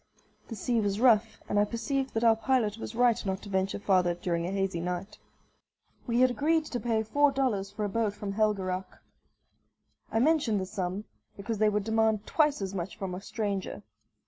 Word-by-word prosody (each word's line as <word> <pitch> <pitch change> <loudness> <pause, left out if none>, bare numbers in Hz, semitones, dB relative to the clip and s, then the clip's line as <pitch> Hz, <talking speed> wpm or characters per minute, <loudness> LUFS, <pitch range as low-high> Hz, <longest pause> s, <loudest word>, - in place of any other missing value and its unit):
The 225 - -6
sea 230 +3 0
was 200 0 -1
rough, 225 -3 +3
and 205 - +1
I - - +5
perceived 260 +5 -2
that 225 - 0
our 225 -1 +6
pilot 225 -2 0
was 225 - -6
right 240 -1 +3
not 190 -1 -3
to 205 - -9
venture 190 0 0
farther 185 -3 +2
during 170 -1 -2
a - - -3
hazy 195 -3 -1
night. 180 +4 -4 0.9
We 240 +1 +2
had 255 0 +5
agreed 315 +5 +1
to 245 - -4
pay 225 -2 0
four 285 +6 +3
dollars 230 -8 0
for 210 +1 -3
a - - -2
boat 215 -1 0
from 205 -1 -5
Helgeraac. 195 -3 -1 1.1
I - - 0
mention 270 -4 +3
the 190 - -2
sum, 185 0 -3 0.3
because 210 +2 -4
they 215 0 +4
would 210 -1 0
demand 220 -1 +1
twice 295 -8 +2
as 190 0 -4
much 185 0 -5
from 190 -2 -4
a 180 - -5
stranger. 200 - -3
210 Hz, 195 wpm, -29 LUFS, 195-235 Hz, 1.1 s, our